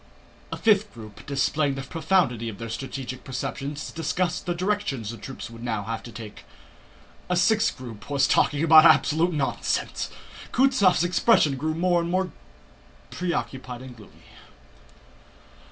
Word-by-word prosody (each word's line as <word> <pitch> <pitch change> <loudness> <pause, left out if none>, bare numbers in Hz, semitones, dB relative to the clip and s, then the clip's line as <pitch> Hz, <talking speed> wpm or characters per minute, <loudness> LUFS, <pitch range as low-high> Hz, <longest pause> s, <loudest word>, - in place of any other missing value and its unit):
A - - -4
fifth 210 -2 +3
group, 110 0 -11
displaying 140 +1 0
the 135 - -5
profundity 160 - 0
of 105 - -8
their 115 +2 -6
strategic 130 +1 -6
perceptions, 135 +3 -5
discussed 170 +3 -2
the 175 - 0
direction 185 - -1
the 110 +2 -5
troops 115 +2 -8
would 115 0 -11
now 110 -4 -2
have 110 +2 -4
to 120 - -10
take. 110 -1 -10 0.9
A 180 - +2
sixth 220 +5 +2
group 115 -4 -10
was 140 -2 +3
talking 145 +2 +2
absolute 160 +1 +6
nonsense. 150 -4 -2 0.4
Kutúzov's 255 -10 +4
expression 175 -4 +3
grew 155 +4 -2
more 175 +1 +2
and 170 - -3
more 185 0 0 0.8
preoccupied 130 -8 -4
and 130 -2 -10
gloomy. 110 -3 -17
145 Hz, 135 wpm, -25 LUFS, 120-180 Hz, 0.9 s, absolute